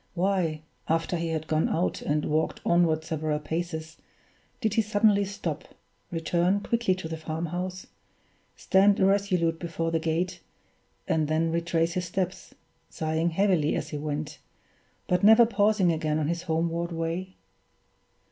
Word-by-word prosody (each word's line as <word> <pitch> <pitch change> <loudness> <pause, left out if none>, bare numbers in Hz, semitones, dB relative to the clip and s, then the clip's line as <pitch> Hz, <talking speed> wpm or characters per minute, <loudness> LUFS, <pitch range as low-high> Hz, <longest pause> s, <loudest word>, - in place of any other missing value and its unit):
Why, 175 -4 0 0.3
after 165 +2 +1
he 170 0 -2
had 160 -1 -2
gone 155 0 +1
out 175 +3 -1
and 150 0 0
had - - -3
walked 155 +1 0
onward 165 -2 +3
several 155 -1 -2
paces, 160 +1 -4 0.6
did 220 -4 0
he 225 - +3
suddenly 205 -1 +3
stop, 175 -6 -5 0.4
return 175 +4 +1
quickly 230 -4 +1
to 185 -3 -6
the 160 0 -5
farmhouse, 170 +4 -4 0.7
stand 195 +1 +3
irresolute 190 -4 +2
before 165 -1 -3
the 165 - +1
gate, 165 +3 -2 0.7
and 155 -2 +1
then 160 +2 +1
retrace 170 0 0
his 180 0 -2
steps, 180 +1 -4 0.3
sighing 160 +1 -1
heavily 175 -3 +2
as - - -3
he 150 - -4
went, 150 0 -4 0.7
but 180 +1 +1
never 220 +3 +8
pausing 205 -5 +2
again 155 -1 -1
on 155 -1 0
his 170 0 -1
homeward 170 0 -1
way? 170 +3 -3
170 Hz, 145 wpm, -27 LUFS, 160-185 Hz, 0.7 s, never